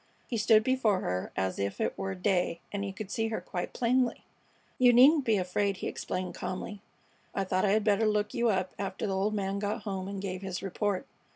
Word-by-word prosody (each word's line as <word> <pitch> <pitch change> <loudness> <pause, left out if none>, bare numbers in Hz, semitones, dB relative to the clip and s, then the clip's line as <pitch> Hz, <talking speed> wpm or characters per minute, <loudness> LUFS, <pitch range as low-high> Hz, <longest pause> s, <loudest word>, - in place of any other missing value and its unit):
He 240 - -3
stood 220 0 +5
before 230 -6 +2
her 90 0 -2
as 95 -1 -1
if 100 0 -2
it - - 0
were 195 0 -3
day 180 -2 +1
and 200 -1 -2
he 200 - -3
could 195 +1 -7
see 225 0 0
her 220 - -2
quite 180 -2 -4
plainly. 245 0 +1 0.6
"You 250 -1 +7
needn't 275 +4 +7
be 220 -2 +3
afraid," 195 +2 0
he - - -4
explained, 185 -1 -3
calmly. 195 +2 -5 0.5
"I 195 - +1
thought 185 0 +1
I 200 - +3
had 215 0 +2
better 210 +1 +3
look 210 -1 0
you 235 0 +2
up 185 -3 0
after 195 0 -3
the 195 - -1
old 205 +3 0
man 195 -1 -1
got 210 +2 -2
home 190 -2 -3
and 200 0 -4
gave 190 -1 -4
his 190 -2 -4
report. 195 0 -1
200 Hz, 215 wpm, -30 LUFS, 185-220 Hz, 0.6 s, You